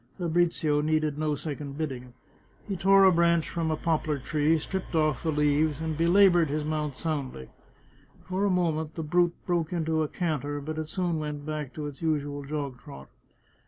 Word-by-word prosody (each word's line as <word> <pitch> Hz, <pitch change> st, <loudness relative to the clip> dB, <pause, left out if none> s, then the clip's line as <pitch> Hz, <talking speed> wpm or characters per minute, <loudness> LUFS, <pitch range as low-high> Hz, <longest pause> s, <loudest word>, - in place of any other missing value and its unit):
Fabrizio 165 Hz, -4 st, +1 dB
needed 155 Hz, -1 st, 0 dB
no 155 Hz, -1 st, 0 dB
second 145 Hz, -1 st, -6 dB
bidding. 130 Hz, -5 st, -5 dB, 0.5 s
He 200 Hz, -, -2 dB
tore 195 Hz, +2 st, +5 dB
a 190 Hz, -, +7 dB
branch 170 Hz, -1 st, +3 dB
from 165 Hz, -1 st, -2 dB
a 155 Hz, -, 0 dB
poplar 155 Hz, -3 st, 0 dB
tree, 150 Hz, +4 st, +1 dB
stripped 185 Hz, +3 st, -4 dB
off 155 Hz, -3 st, +2 dB
the 160 Hz, -, 0 dB
leaves, 150 Hz, 0 st, +2 dB
and 160 Hz, -1 st, -2 dB
belaboured 175 Hz, 0 st, +5 dB
his 150 Hz, +1 st, -2 dB
mount 150 Hz, -2 st, -2 dB
soundly. 135 Hz, -, -4 dB, 0.7 s
For 185 Hz, +2 st, -2 dB
a 205 Hz, -, +3 dB
moment 160 Hz, -4 st, 0 dB
the 160 Hz, -, -3 dB
brute 175 Hz, +2 st, +2 dB
broke 170 Hz, -2 st, 0 dB
into 160 Hz, -2 st, 0 dB
a 155 Hz, -, 0 dB
can 160 Hz, -4 st, -2 dB
ter, 145 Hz, 0 st, -4 dB
but 155 Hz, +2 st, -5 dB
it 155 Hz, -1 st, -4 dB
soon 175 Hz, -4 st, -1 dB
went 150 Hz, -1 st, -5 dB
back 155 Hz, -3 st, -4 dB
to 150 Hz, -, -5 dB
its 145 Hz, +1 st, -8 dB
usual 145 Hz, -3 st, -1 dB
jog 140 Hz, -3 st, -4 dB
trot. 70 Hz, -, -12 dB
155 Hz, 185 wpm, -27 LUFS, 145-170 Hz, 0.7 s, a